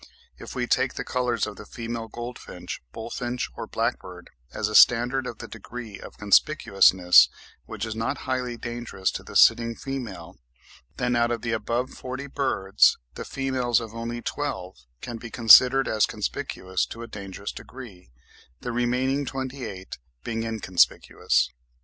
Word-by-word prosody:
If -, -, -9 dB
we 125 Hz, -, -1 dB
take 130 Hz, +1 st, +1 dB
the -, -, -3 dB
colours 125 Hz, -1 st, 0 dB
of 105 Hz, -, -8 dB
the 105 Hz, -, -10 dB
female 115 Hz, -1 st, -5 dB
goldfinch, 120 Hz, +2 st, -7 dB
bullfinch, 120 Hz, +2 st, -4 dB
or -, -, -6 dB
blackbird, -, -, -3 dB, 0.2 s
as 105 Hz, -, -2 dB
a 105 Hz, -, -5 dB
standard 125 Hz, +4 st, +5 dB
of 115 Hz, -, -6 dB
the -, -, -8 dB
degree 115 Hz, -1 st, -9 dB
of -, -, -11 dB
conspicuousness, 100 Hz, -5 st, +5 dB, 0.4 s
which 110 Hz, 0 st, -4 dB
is 110 Hz, -1 st, -5 dB
not 115 Hz, +5 st, -2 dB
highly 125 Hz, -2 st, -2 dB
dangerous 120 Hz, -5 st, -3 dB
to -, -, -6 dB
the -, -, -12 dB
sitting 115 Hz, 0 st, +5 dB
female, 115 Hz, -13 st, -7 dB, 0.6 s
then 125 Hz, -1 st, 0 dB
out 120 Hz, 0 st, +2 dB
of 120 Hz, -2 st, -3 dB
the 115 Hz, -, -1 dB
above 120 Hz, +3 st, -1 dB
forty 130 Hz, +2 st, -6 dB
birds 135 Hz, -9 st, +2 dB, 0.2 s
the -, -, -6 dB
females 130 Hz, -3 st, 0 dB
of 115 Hz, -2 st, -8 dB
only 115 Hz, +1 st, -5 dB
twelve 140 Hz, -11 st, -4 dB, 0.3 s
can 120 Hz, -1 st, -6 dB
be 115 Hz, 0 st, -9 dB
considered 125 Hz, +4 st, +7 dB
as 110 Hz, -2 st, +2 dB
conspicuous 95 Hz, -1 st, -3 dB
to 115 Hz, -, -8 dB
a -, -, -8 dB
dangerous 100 Hz, -2 st, -7 dB
degree, 115 Hz, -, -11 dB, 0.5 s
the 120 Hz, -, -4 dB
remaining 125 Hz, +4 st, 0 dB
twenty 135 Hz, -1 st, -5 dB
eight 95 Hz, -, -8 dB, 0.2 s
being 115 Hz, -1 st, -3 dB
inconspicuous. 110 Hz, -6 st, +1 dB
120 Hz, 155 wpm, -25 LUFS, 110-125 Hz, 0.6 s, considered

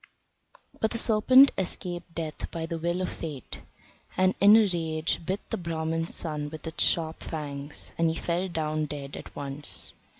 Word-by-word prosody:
But 220 Hz, -, +2 dB
the 230 Hz, -, -1 dB
serpent 255 Hz, +5 st, +7 dB
escaped 175 Hz, -2 st, -3 dB
death 160 Hz, -2 st, -4 dB
by 165 Hz, -2 st, -4 dB
the 165 Hz, 0 st, -4 dB
will 175 Hz, +2 st, -1 dB
of 185 Hz, -, -1 dB
fate, 150 Hz, -6 st, -7 dB, 0.6 s
and 185 Hz, 0 st, +4 dB
in 205 Hz, +2 st, +9 dB
a 225 Hz, -, +6 dB
rage 160 Hz, -3 st, -1 dB
bit 190 Hz, +5 st, -3 dB
the -, -, 0 dB
Brahman's 165 Hz, -1 st, -2 dB
son 150 Hz, -3 st, -2 dB
with 155 Hz, 0 st, -9 dB
its 160 Hz, -, -1 dB
sharp 160 Hz, -1 st, +1 dB
fangs, 145 Hz, -2 st, -5 dB
and 165 Hz, -1 st, +4 dB
he 160 Hz, -, -1 dB
fell 175 Hz, +3 st, -1 dB
down 155 Hz, -3 st, -1 dB
dead 140 Hz, -1 st, -6 dB
at -, -, -10 dB
once. 140 Hz, +1 st, -3 dB
165 Hz, 170 wpm, -28 LUFS, 155-180 Hz, 0.6 s, in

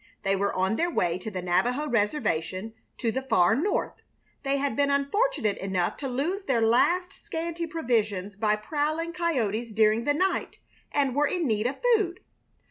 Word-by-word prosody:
They 195 Hz, 0 st, +2 dB
were 200 Hz, +1 st, 0 dB
on 190 Hz, +4 st, +1 dB
their 345 Hz, -, +1 dB
way 175 Hz, -, 0 dB
to 205 Hz, -, -5 dB
the 185 Hz, -3 st, -5 dB
Navajo 245 Hz, +11 st, +1 dB
reservation 210 Hz, -, -1 dB, 0.2 s
to 230 Hz, -, 0 dB
the 265 Hz, -, -2 dB
far 225 Hz, -5 st, +3 dB
north. 335 Hz, -, -1 dB, 0.4 s
They 275 Hz, 0 st, 0 dB
had 280 Hz, 0 st, -1 dB
been 285 Hz, 0 st, +2 dB
unfortunate 280 Hz, -, +1 dB
enough 185 Hz, -2 st, -1 dB
to 275 Hz, -, -4 dB
lose 295 Hz, +10 st, -1 dB
their 260 Hz, -4 st, +2 dB
last 260 Hz, +11 st, +3 dB
scanty 335 Hz, +1 st, -4 dB
provisions 220 Hz, -, -1 dB
by 210 Hz, +1 st, +2 dB
prowling 310 Hz, +9 st, -2 dB
coyotes 240 Hz, -, -1 dB
during 220 Hz, +2 st, +3 dB
the 290 Hz, -, +2 dB
night, 375 Hz, +4 st, 0 dB, 0.3 s
and 275 Hz, -3 st, +1 dB
were 295 Hz, +1 st, +3 dB
in 355 Hz, 0 st, -1 dB
need 215 Hz, 0 st, +1 dB
of 265 Hz, -, -2 dB, 0.2 s
food. 375 Hz, -5 st, 0 dB
250 Hz, 170 wpm, -27 LUFS, 210-310 Hz, 0.4 s, far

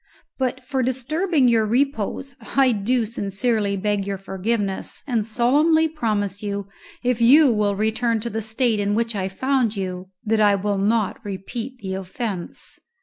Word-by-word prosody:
But 260 Hz, 0 st, -1 dB
for 265 Hz, 0 st, -1 dB
disturbing 275 Hz, +4 st, +1 dB
your 230 Hz, -2 st, +4 dB
repose 265 Hz, +2 st, -1 dB, 0.2 s
I 265 Hz, -2 st, +6 dB
do 230 Hz, +3 st, +1 dB
sincerely 205 Hz, -1 st, -1 dB
beg 205 Hz, 0 st, -1 dB
your 200 Hz, -1 st, -2 dB
forgiveness, 195 Hz, +1 st, -3 dB
and 235 Hz, -5 st, 0 dB
solemnly 290 Hz, +9 st, +3 dB
promise 210 Hz, -, -2 dB
you, 200 Hz, -1 st, -3 dB, 0.4 s
if 245 Hz, -1 st, 0 dB
you 275 Hz, +4 st, +7 dB
will 205 Hz, -2 st, +1 dB
return 220 Hz, +2 st, 0 dB
to 235 Hz, -, -2 dB
the 225 Hz, -, -2 dB
state 220 Hz, +1 st, 0 dB
in 205 Hz, 0 st, 0 dB
which 230 Hz, 0 st, -1 dB
I 190 Hz, -1 st, -1 dB
found 250 Hz, +1 st, 0 dB
you, 185 Hz, -1 st, -4 dB, 0.2 s
that 220 Hz, 0 st, +2 dB
I 205 Hz, -1 st, +5 dB
will 200 Hz, 0 st, -1 dB
not 210 Hz, 0 st, 0 dB
repeat 225 Hz, +6 st, -6 dB
the 190 Hz, -2 st, -4 dB
offence." 190 Hz, 0 st, -5 dB
220 Hz, 155 wpm, -22 LUFS, 200-250 Hz, 0.4 s, you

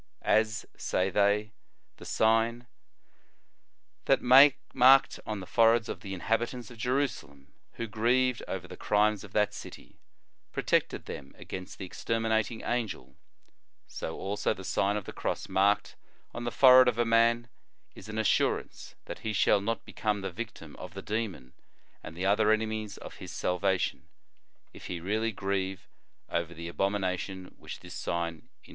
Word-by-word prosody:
" -, -, -50 dB
As," 110 Hz, +1 st, +2 dB
say 95 Hz, +1 st, -1 dB
they, 105 Hz, +2 st, +2 dB, 0.2 s
" -, -, -46 dB
the -, -, -12 dB
sign 115 Hz, +2 st, +2 dB, 1.4 s
Thau 135 Hz, +4 st, +7 dB, 0.2 s
marked 135 Hz, +1 st, +6 dB
on 105 Hz, -2 st, -3 dB
the -, -, -7 dB
fore 115 Hz, +3 st, +5 dB
heads 115 Hz, -1 st, -1 dB
of -, -, -4 dB
the 95 Hz, -2 st, -6 dB
inhabitants 115 Hz, +4 st, -2 dB
of 115 Hz, -, -13 dB
Jerusalem 115 Hz, -, -2 dB, 0.2 s
who 115 Hz, -, -4 dB
grieved 120 Hz, +3 st, +1 dB
over 90 Hz, -1 st, -5 dB
the -, -, -9 dB
crimes 105 Hz, 0 st, +1 dB
of 100 Hz, -, -11 dB
that 105 Hz, -1 st, +2 dB
city, -, -, -11 dB, 0.5 s
protected -, -, 0 dB
them 70 Hz, -1 st, -8 dB
against 95 Hz, 0 st, -8 dB
the 95 Hz, -, -6 dB
exterminating 110 Hz, +3 st, -1 dB
angel, 120 Hz, -3 st, -3 dB, 0.7 s
so 80 Hz, -, -6 dB
also 105 Hz, +2 st, -1 dB
the 95 Hz, -, -9 dB
Sign 100 Hz, +3 st, 0 dB
of 105 Hz, -, -5 dB
the -, -, -8 dB
Cross -, -, -3 dB
marked 100 Hz, +2 st, +2 dB, 0.4 s
on 120 Hz, 0 st, -5 dB
the 120 Hz, -, -1 dB
fore 130 Hz, 0 st, +8 dB
head 130 Hz, -, +6 dB
of 120 Hz, -2 st, +1 dB
a 120 Hz, -, +2 dB
man, 115 Hz, +1 st, +3 dB, 0.5 s
is -, -, -12 dB
an 110 Hz, -, -5 dB
assurance 110 Hz, -, 0 dB
that -, -, -7 dB
he 110 Hz, -, -3 dB
shall 100 Hz, +1 st, +3 dB
not 115 Hz, +3 st, -3 dB
become 105 Hz, -2 st, -2 dB
the 95 Hz, -1 st, -4 dB
victim 110 Hz, -5 st, -8 dB
of 90 Hz, 0 st, -9 dB
the 95 Hz, -, -6 dB
demon 105 Hz, -, -4 dB, 0.5 s
and 80 Hz, -, -10 dB
the 90 Hz, -, -2 dB
other 105 Hz, +2 st, +3 dB
enemies 110 Hz, -1 st, -1 dB
of -, -, -10 dB
his -, -, -9 dB
salvation, 95 Hz, 0 st, -1 dB, 0.7 s
if -, -, -10 dB
he 90 Hz, -, -4 dB
really 110 Hz, +6 st, -1 dB
grieve 95 Hz, -1 st, -3 dB, 0.4 s
over 85 Hz, 0 st, -2 dB
the 85 Hz, +1 st, -7 dB
abomination 95 Hz, 0 st, -2 dB
which -, -, -9 dB
this -, -, -10 dB
sign 85 Hz, -2 st, -3 dB
interdicts." -, -, -19 dB
105 Hz, 165 wpm, -29 LUFS, 95-115 Hz, 1.4 s, fore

